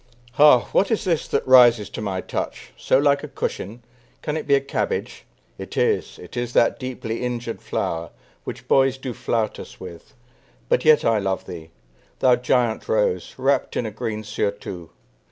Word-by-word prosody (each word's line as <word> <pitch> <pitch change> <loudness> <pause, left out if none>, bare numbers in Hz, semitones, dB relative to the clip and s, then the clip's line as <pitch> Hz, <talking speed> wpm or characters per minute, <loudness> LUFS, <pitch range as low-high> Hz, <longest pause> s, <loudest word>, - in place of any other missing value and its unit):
Ha! 145 -1 +6
what 195 - +2
is 225 -1 0
this 170 -6 0
that - - -1
rises 120 -5 +6
to - - -6
my 95 -3 -2
touch, - - -5
So - - +2
like 140 0 +3
a - - -5
cushion? 115 +5 -5 0.4
Can 150 - -2
it 160 - -4
be 140 - +5
a - - +3
cabbage? 455 - -3 0.3
It - - -8
is, 450 -3 0
it - - -12
is 120 0 -3
that 115 - +3
deeply 120 -3 -5
injured 120 -2 -4
flower, 80 0 -3 0.3
Which - - -8
boys 135 -1 +3
do 130 -2 -5
flout 110 -2 -2
us - - -11
with; 90 -3 -11 0.5
but - - +2
yet 155 -1 +5
I 115 -2 +3
love 95 -1 -2
thee, 80 -2 -9 0.5
Thou 125 -1 +4
giant 125 -2 0
rose, 105 -5 0
wrapped 135 +1 0
in 120 - -1
a 110 - -4
green 110 0 -4
surtout. 100 -5 -4
120 Hz, 175 wpm, -22 LUFS, 105-135 Hz, 0.5 s, Ha